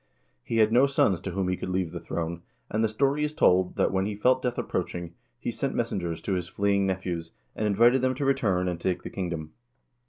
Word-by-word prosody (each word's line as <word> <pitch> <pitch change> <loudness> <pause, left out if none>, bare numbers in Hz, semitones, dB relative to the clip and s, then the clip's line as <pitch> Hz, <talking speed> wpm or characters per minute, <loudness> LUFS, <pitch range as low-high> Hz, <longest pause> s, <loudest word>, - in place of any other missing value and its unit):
He 115 - -2
had 110 -1 +4
no 125 +4 +5
sons 100 -10 +2
to 95 - -4
whom 95 +1 -1
he 90 - +1
could 95 - -5
leave 90 -2 -1
the - - -5
throne, 85 0 -4 0.3
and 110 +1 +1
the 110 - +2
story 140 +6 +1
is 150 0 -1
told 90 -8 +3
that, - - +2
when 95 +1 0
he 105 - -3
felt 125 +5 +3
death 125 -1 -2
approaching, 85 -1 -3 0.3
he - - -3
sent - - -2
messengers 85 -4 -2
to 100 - -1
his 90 -2 -2
fleeing 100 +1 +1
nephews, 90 -3 -3 0.2
and 105 - 0
invited 120 +5 +4
them 130 0 +1
to 140 - -2
return 105 -10 +1
and 85 -1 -3
take 90 -1 -1
the - - -7
kingdom. 85 -5 -4
95 Hz, 225 wpm, -27 LUFS, 90-115 Hz, 0.3 s, no